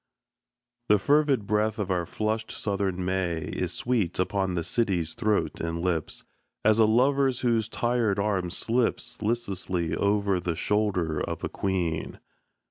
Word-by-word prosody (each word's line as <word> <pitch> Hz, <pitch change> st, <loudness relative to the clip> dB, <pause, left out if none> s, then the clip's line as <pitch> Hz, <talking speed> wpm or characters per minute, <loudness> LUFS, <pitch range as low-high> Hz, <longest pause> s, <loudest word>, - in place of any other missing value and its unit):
The 105 Hz, -, +6 dB
fervid 140 Hz, 0 st, +2 dB
breath 105 Hz, +1 st, +1 dB
of 100 Hz, -3 st, -2 dB
our 90 Hz, -2 st, 0 dB
flushed 110 Hz, +1 st, -2 dB
Southern 95 Hz, -3 st, -2 dB
May 90 Hz, -3 st, -1 dB
Is -, -, -3 dB
sweet 115 Hz, -8 st, 0 dB
upon 95 Hz, 0 st, 0 dB
the 85 Hz, -, -1 dB
city's 90 Hz, -4 st, 0 dB
throat 105 Hz, -9 st, 0 dB
and 85 Hz, 0 st, -2 dB
lips, 85 Hz, -3 st, -2 dB, 0.4 s
As 110 Hz, +1 st, +5 dB
a 110 Hz, -, +7 dB
lover's 130 Hz, +3 st, +3 dB
whose 115 Hz, -3 st, +1 dB
tired 120 Hz, -4 st, +1 dB
arm 100 Hz, -3 st, 0 dB
slips 120 Hz, +4 st, -1 dB
Listlessly 95 Hz, -7 st, -1 dB
over 100 Hz, -2 st, +1 dB
the 85 Hz, -1 st, -2 dB
shoulder 90 Hz, -4 st, 0 dB
of -, -, -4 dB
a -, -, -1 dB
queen. 90 Hz, -5 st, -2 dB
100 Hz, 140 wpm, -27 LUFS, 90-115 Hz, 0.4 s, a